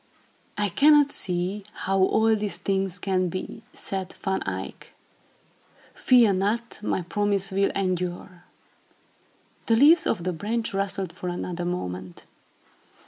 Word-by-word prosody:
"I 205 -1 +1
cannot 290 - +5
see 185 +2 0
how 195 +1 -1
all 220 +4 +3
these 205 -4 -3
things 190 0 -1
can 185 -1 0
be," 185 +5 -6
said 190 -1 -4
Van 190 0 -1
Eyck. - - -6 1.0
"Fear 240 -5 +4
not, 210 +5 -2
my 190 -3 -1
promise 200 +2 0
will 195 +1 +2
endure." 180 -2 -3 1.2
The 230 - +4
leaves 310 +7 +6
of 185 -6 -1
the 185 0 -1
branch 220 +7 -2
rustled 195 -2 -2
for 180 0 -5
another 175 0 -4
moment. 95 - -5
195 Hz, 125 wpm, -25 LUFS, 180-210 Hz, 1.2 s, leaves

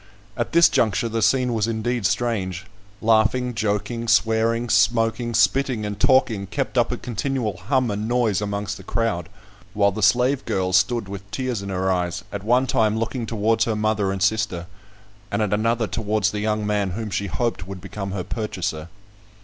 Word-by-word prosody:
At 120 -2 -2
this 170 0 +7
juncture 110 +1 +1
the 115 0 -2
scene 125 +4 +2
was 110 -1 0
indeed 115 -1 0
strange. 100 -6 -2 0.4
Laughing, 115 +3 +2
joking, 110 +2 -2
swearing, 115 +1 +2
smoking, 115 +1 +2
spitting, 125 -1 +2
and 105 0 -5
talking 115 -7 +3
kept - - -3
up - - +2
a - - -2
continual 120 -4 -2
hum 130 +3 0
and 105 +2 -3
noise 120 -5 +1
amongst 100 0 -3
the 95 - -12
crowd; 100 -6 -2 0.5
while 100 -1 +3
the 110 +3 -5
slave 125 +6 +3
girl 95 -4 -1
stood 115 +2 +2
with 100 0 -8
tears 125 0 -3
in 100 - -6
her 95 0 0
eyes, 90 +1 -1
at 100 -1 -5
one 125 +4 +3
time 110 -3 +1
looking 115 +1 -3
towards 115 +1 +1
her 110 - -1
mother 105 -2 0
and 95 -1 -2
sister, 100 -4 0 0.6
and 100 +2 0
at 105 -1 -1
another 115 +2 +1
towards 105 -1 0
the 105 - -3
young 105 0 -1
man 105 -2 0
whom 110 -2 -4
she 100 +1 -1
hoped 115 -1 -2
would 95 -1 -7
become 100 +2 -6
her 95 -1 -3
purchaser. 90 -8 -4
110 Hz, 180 wpm, -23 LUFS, 100-115 Hz, 0.6 s, this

